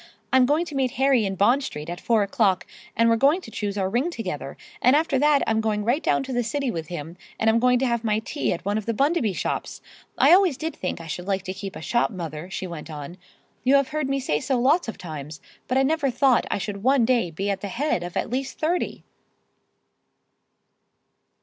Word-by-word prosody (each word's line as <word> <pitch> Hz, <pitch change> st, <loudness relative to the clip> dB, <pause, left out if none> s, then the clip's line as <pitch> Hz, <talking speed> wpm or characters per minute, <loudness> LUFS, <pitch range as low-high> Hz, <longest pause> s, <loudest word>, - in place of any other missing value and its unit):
I'm 260 Hz, -1 st, +6 dB
going 305 Hz, +5 st, +2 dB
to 325 Hz, -, -9 dB
meet 265 Hz, -3 st, 0 dB
Harry 265 Hz, -5 st, +3 dB
in 195 Hz, -, -3 dB
Bond 240 Hz, +9 st, +3 dB
Street 150 Hz, -, -6 dB
at 175 Hz, +1 st, -6 dB
four 225 Hz, -3 st, +2 dB
o'clock, 195 Hz, -2 st, +1 dB, 0.3 s
and 230 Hz, +1 st, +3 dB
we're 230 Hz, -, +4 dB
going 285 Hz, +9 st, +4 dB
to 225 Hz, -, -11 dB
choose 205 Hz, -1 st, -3 dB
our 190 Hz, -1 st, +1 dB
ring 245 Hz, -, 0 dB
together; 150 Hz, -, -5 dB, 0.2 s
and 255 Hz, +3 st, +5 dB
after 300 Hz, -3 st, +2 dB
that 295 Hz, 0 st, +4 dB
I'm 220 Hz, 0 st, +1 dB
going 210 Hz, -1 st, -1 dB
right 250 Hz, +7 st, +1 dB
down -, -, +1 dB
to 265 Hz, -1 st, -5 dB
the 245 Hz, 0 st, +1 dB
city 275 Hz, +2 st, -1 dB
with 165 Hz, -4 st, -5 dB
him, 170 Hz, 0 st, -7 dB, 0.2 s
and 220 Hz, 0 st, +4 dB
I'm 230 Hz, -, +2 dB
going 250 Hz, +1 st, +4 dB
to 265 Hz, -, 0 dB
have 235 Hz, -2 st, 0 dB
my 215 Hz, -2 st, +1 dB
tea 230 Hz, +7 st, -2 dB
at 170 Hz, -, -4 dB
one 205 Hz, +2 st, 0 dB
of 215 Hz, -, -10 dB
the 230 Hz, -, 0 dB
Bundaby 275 Hz, -, +1 dB
shops. -, -, -3 dB, 0.4 s
I -, -, +6 dB
always 365 Hz, -7 st, +4 dB
did 320 Hz, +2 st, -4 dB
think 180 Hz, -, -4 dB
I 165 Hz, -, -9 dB
should 180 Hz, +3 st, -6 dB
like 195 Hz, -2 st, 0 dB
to 185 Hz, 0 st, -4 dB
keep 195 Hz, 0 st, -7 dB
a -, -, -8 dB
shop 235 Hz, +6 st, +1 dB
mother," 170 Hz, -4 st, -6 dB
she 190 Hz, -, -4 dB
went 165 Hz, -3 st, -7 dB
on, 150 Hz, +4 st, -8 dB, 0.4 s
"you 265 Hz, +2 st, +4 dB
have 275 Hz, -1 st, +3 dB
heard 300 Hz, -2 st, -2 dB
me 275 Hz, 0 st, 0 dB
say 150 Hz, -, 0 dB
so 260 Hz, -, 0 dB
lots 290 Hz, +7 st, +3 dB
of 225 Hz, -, -5 dB
times, 155 Hz, -3 st, -7 dB, 0.3 s
but 255 Hz, -, +1 dB
I 265 Hz, -, +4 dB
never 290 Hz, 0 st, +1 dB
thought 255 Hz, 0 st, +3 dB
that -, -, -3 dB
I -, -, -1 dB
should 200 Hz, 0 st, -5 dB
one 260 Hz, +1 st, +3 dB
day 240 Hz, -7 st, +2 dB
be 195 Hz, +5 st, -2 dB
at 195 Hz, -, -3 dB
the 205 Hz, -, -4 dB
head 240 Hz, -, -1 dB
of 175 Hz, 0 st, -5 dB
at -, -, -2 dB
least 265 Hz, +1 st, -3 dB
thirty!" 340 Hz, +3 st, -1 dB
230 Hz, 240 wpm, -24 LUFS, 190-270 Hz, 0.4 s, I'm